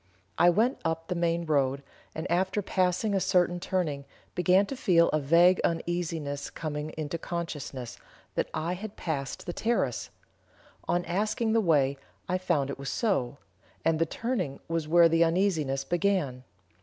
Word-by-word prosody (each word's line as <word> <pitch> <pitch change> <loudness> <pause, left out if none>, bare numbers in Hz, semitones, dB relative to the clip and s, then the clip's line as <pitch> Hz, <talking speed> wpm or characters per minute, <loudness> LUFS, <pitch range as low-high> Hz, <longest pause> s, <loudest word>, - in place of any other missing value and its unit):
I 175 - +7
went 225 +9 +2
up 165 +1 -2
the - - +1
main 170 -1 0
road, 140 -3 +1 0.3
and, 160 - -4
after 190 +3 +1
passing 185 +3 +1
a 195 - +2
certain 180 -2 +2
turning, 160 -7 -2 0.3
began 180 +3 +4
to 270 - -5
feel 175 -9 +4
a 155 - +1
vague 170 +6 +5
uneasiness 165 -4 -2
coming 150 -1 -4
into 155 +1 -3
consciousness, 150 -8 -5 0.3
that - - -1
I 170 +3 -2
had 200 +3 -7
passed 140 -5 -4
the 175 - -4
terrace. 235 +5 -1 0.8
On 175 0 +1
asking 215 +4 0
the 225 - +4
way, 140 -7 +2 0.3
I 185 +1 0
found 155 -7 0
it - - -7
was 140 - -4
so; 145 - 0 0.5
and 160 -1 +2
the 165 - +2
turning 200 - -3
was 165 -2 -2
where 170 +1 +6
the 165 0 +4
uneasiness 165 -6 +1
began. 170 -6 0
170 Hz, 155 wpm, -28 LUFS, 150-185 Hz, 0.8 s, I